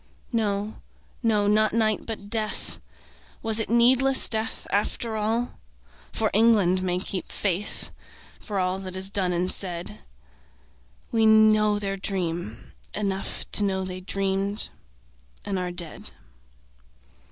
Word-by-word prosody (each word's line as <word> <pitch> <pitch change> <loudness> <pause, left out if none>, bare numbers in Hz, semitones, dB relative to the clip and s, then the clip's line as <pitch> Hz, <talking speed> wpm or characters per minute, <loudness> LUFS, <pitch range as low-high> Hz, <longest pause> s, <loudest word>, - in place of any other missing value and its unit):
No, 210 -1 -1 0.4
no, 215 -4 +2
not 215 +1 +3
night 220 -2 +1
but 215 -3 -5
death; 215 0 -2 0.6
Was 225 0 +4
it 220 - -1
needless 255 +3 +5
death 220 0 -2
after 220 +2 -1
all? 225 +3 -1 0.5
For 220 -1 0
England 205 -4 +4
may 180 -1 0
keep 185 0 -2
faith 200 0 -1 0.5
For 205 - -5
all 185 0 0
that 185 -1 -6
is 190 +1 -1
done 190 -3 +1
and 180 +1 +1
said. 170 - -3 1.1
We 225 -1 +3
know 215 -1 +5
their 195 -1 -3
dream; 175 - -4 0.2
enough 195 -2 -2
To 210 - +5
know 190 -1 0
they 185 0 -5
dreamed 195 +2 +1 0.8
and 195 -2 -2
are 180 -1 -3
dead. 175 -2 -4
205 Hz, 125 wpm, -25 LUFS, 185-220 Hz, 1.1 s, needless